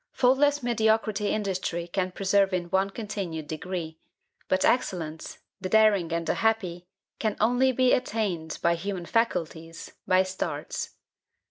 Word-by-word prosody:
Faultless 280 +2 +3
mediocrity 220 -3 +1
industry 185 -5 -2
can 185 +1 -1
preserve 195 +1 +2
in 175 -1 -4
one 190 +1 +2
continued 195 -7 -5
degree; 160 0 -5 0.5
but 185 0 +2
excellence, 165 -10 -1 0.2
the 185 -1 -4
daring 205 -5 +4
and 170 0 -1
the - - +1
happy, 185 -6 -1 0.3
can 215 -2 -1
only 245 +4 +3
be 255 0 +3
attained, 195 -10 -1
by 170 - +4
human 180 +1 -4
faculties, 165 -7 -2 0.2
by 185 0 +5
starts. 185 0 -4
190 Hz, 130 wpm, -27 LUFS, 170-220 Hz, 0.5 s, by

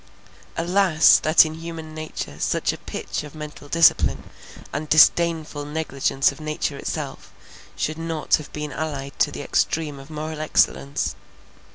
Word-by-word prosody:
Alas! 175 -1 +5
that 155 +1 +6
in 155 - -4
human 160 -1 -8
nature 155 - -6
such - - 0
a - - -7
pitch - - -5
of 150 0 -11
mental 150 -1 -9
discipline, 165 0 +4 0.5
and 150 +1 -4
disdainful 160 -1 +4
negligence 145 -3 0
of - - -13
nature 155 -1 -2
itself, - - -5 0.4
should 155 +1 -2
not 165 -2 +1
have 150 - -10
been 150 -1 -5
allied 140 -3 -4
to - - +4
the - - -6
extreme 150 -3 -1
of 135 +2 -13
moral 155 0 -5
excellence! 145 -2 +1
155 Hz, 145 wpm, -23 LUFS, 150-160 Hz, 0.5 s, that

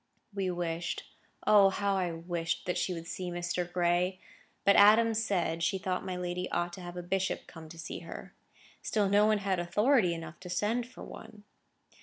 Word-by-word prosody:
We 195 -2 -1
wished, 175 -1 -3 0.4
O 205 -2 +7
how 200 +1 0
I 180 -2 0
wished 165 0 -3
that 180 - -1
she - - 0
would 165 -2 -5
see 180 +1 -4
Mr. 175 0 -3
Gray! 180 +1 +1 0.5
But 200 - +6
Adams 225 +2 +6
said, 170 -5 0
she 190 +4 +1
thought 185 -1 -2
my 185 - -4
lady 180 0 -3
ought 175 0 -1
to 185 - -8
have 175 0 -8
a 175 - -4
bishop 190 +2 -1
come 160 -1 -11
to 165 - -11
see 165 - -6
her. - - -9 0.5
Still 210 -2 +1
no 205 +2 +4
one 215 -1 +3
had 195 -3 -1
authority 195 +2 +3
enough 165 0 -8
to 180 - -9
send 220 +7 0
for 255 - -11
one. 215 -2 -11
180 Hz, 190 wpm, -31 LUFS, 175-200 Hz, 0.5 s, O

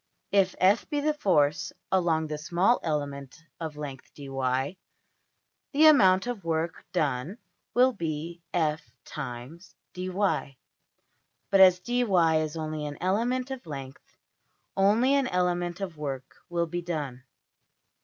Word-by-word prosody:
If 195 -2 +3
$f$ 195 +4 +3
be 295 -2 0
the 305 +1 +1
force 155 - +2 0.2
along 170 -4 +2
the 150 -1 -4
small 175 +9 +2
element 140 -3 -3 0.2
of 160 -3 -5
length~$dy$, 135 0 -3 1.0
the 300 +3 +5
amount 195 -11 +6
of 245 -5 -4
work 165 0 -2
done 150 - -1 0.4
will 255 +1 +5
be 170 -2 -4
$f 155 -2 0 0.2
× 145 +4 -8 0.2
dy$. 185 -6 -1 0.9
But 195 - +5
as 185 -1 +8
$dy$ 195 -9 +2
is 155 +1 -5
only 155 -1 -3
an 145 - -7
element 240 +8 0
of 255 -9 -7
length, 135 -2 -9 0.6
only 215 +7 +4
an 275 -2 +2
element 175 -1 -1
of 195 -2 -3
\DPPageSep{070.png}% 160 - -22
work 135 -3 -5
will 170 -1 0
be 175 +1 -4
done. 145 -7 -4
170 Hz, 130 wpm, -27 LUFS, 150-195 Hz, 1.0 s, as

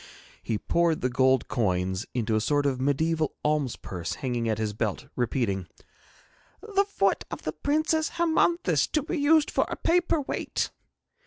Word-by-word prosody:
He 110 - -2
poured 170 +6 +1
the 125 - 0
gold 130 0 +3
coins 95 -4 -1
into 115 -3 0
a 110 - +2
sort 145 +5 +1
of 130 -2 0
mediaeval 155 +3 +1
alms 150 -4 +1
purse 90 -3 -5
hanging 120 -4 -2
at 110 - 0
his 110 -1 -2
belt, 105 -2 -2
repeating: 110 -7 -1 1.1
'The 395 +1 +4
foot 195 - +1
of - - -7
the 155 - -3
Princess 310 - +1
Hermonthis 340 +1 +2
to 305 - +2
be 330 +2 -3
used 300 +1 +4
for - - +1
a - - -3
paper 345 -1 +2
weight!' 280 - -2
140 Hz, 160 wpm, -27 LUFS, -, 1.1 s, The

